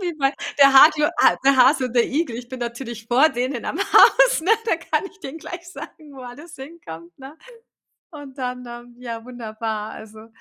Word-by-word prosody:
Wie 355 -2 -3
bei 275 -1 +1 0.3
der 275 -1 +6
Harte 300 +2 +5
Ha - - +4
der 275 0 +4
Hase 260 +1 +4
und 245 - -10
der 240 -1 +3
Igel. 295 -3 -3
Ich 240 0 -10
bin 260 0 -8
natürlich 235 -1 -7
vor 255 +6 +3
denen 250 -2 -4
am 315 - -5
Haus, - - +4
ne? 350 +6 -2
Da 450 - +1
kann 325 +1 -3
ich 410 - -26
denen 320 -1 -9
gleich 345 +2 -10
sagen, 305 -5 -12
wo 270 - -13
alles 290 +7 -12
hinkommt, 220 - -12
ne? 275 +3 -12 0.8
Und 290 -3 -12
dann, 250 -1 -5
ähm, 240 0 -12
ja 230 -2 -7
wunderbar, 220 -3 -6
also 220 0 -13
265 Hz, 195 wpm, -21 LUFS, 240-300 Hz, 0.8 s, der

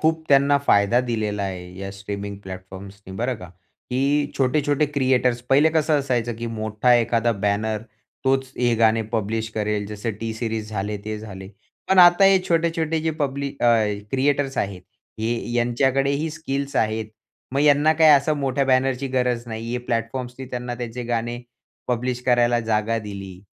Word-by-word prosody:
खूप 160 0 +1
त्यांना 140 0 +5
फायदा 120 -3 +3
दिलेला 110 -4 -2
आहे 90 -2 -6
या 95 0 -5
स्ट्रीमिंग 100 0 -6
प्लॅटफॉर्म्सनी 95 +1 -10
बरं 125 +2 -1
का. 90 - -10 0.4
की 140 +3 +1
छोटे-छोटे 145 +2 +2
क्रिएटर्स 130 -4 +1
पहिले 145 +4 +5
कसं 155 -1 +2
असायचं 120 -4 -1
की 115 0 -5
मोठा 110 +2 0
एखादा 115 0 +2
बॅनर 105 +1 -1 0.4
तोच 135 0 +2
हे 120 -1 +2
गाणे 115 0 +3
पब्लिश 110 +1 -1
करेल 105 -1 -1
जसं 105 +2 -4
टी 115 -1 -3
सीरीज 110 -2 -3
झाले 105 0 -3
ते 110 0 -4
झाले. 95 -3 -9 0.4
पण 190 -1 +3
आता 175 +2 +8
हे 195 -1 +6
छोटे-छोटे 165 -1 +1
जे 160 +1 0
पब्ली 140 -2 -2
अ, 120 - +4 0.4
क्रिएटर्स 135 0 0
आहेत 95 -2 -2 0.4
हे 115 +1 -2
यांच्याकडेही 135 +5 +1
स्किल्स 140 -3 -4
आहेत. 110 0 0 0.5
मग 140 - +1
ह्यांना 150 +1 +5
काही 160 -1 +5
असं 145 +2 +4
मोठ्या 140 0 0
बॅनर 130 0 +2
ची 140 - -2
गरज 125 -2 0
नाही. 115 +1 -5
हे 125 - -1
प्लॅटफॉर्म्सनी 125 +2 -4
त्यांना 125 0 -4
त्यांचे 120 0 -5
गाणे 120 0 -2 0.5
पब्लिश 125 +1 -1
करायला 120 -1 +3
जागा 110 0 0
दिली. 100 -3 -8
120 Hz, 160 wpm, -23 LUFS, 110-140 Hz, 0.5 s, आता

